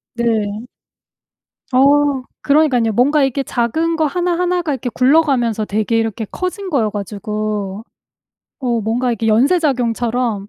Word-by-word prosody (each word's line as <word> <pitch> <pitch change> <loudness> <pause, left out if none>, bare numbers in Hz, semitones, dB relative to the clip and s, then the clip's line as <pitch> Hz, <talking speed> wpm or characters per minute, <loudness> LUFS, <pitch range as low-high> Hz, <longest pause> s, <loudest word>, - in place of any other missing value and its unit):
네. 220 -2 -1 1.1
어. 280 0 +3 0.2
그러니깐요. 280 -6 +2
뭔가 275 +6 +3
이렇게 270 +1 0
작은 295 +7 -1
거 315 - +1
하나하나가 355 0 0
이렇게 250 -1 -4
굴러가면서 255 -5 +2
되게 220 +2 0
이렇게 225 0 -2
커진 375 +1 -4
거여 235 -9 +1
가지고. 210 0 -4 0.8
어 240 -2 0
뭔가 240 +4 -1
이렇게 225 -1 -2
연쇄작용처럼 240 - +1
245 Hz, 300 characters per minute, -17 LUFS, 220-290 Hz, 1.1 s, 어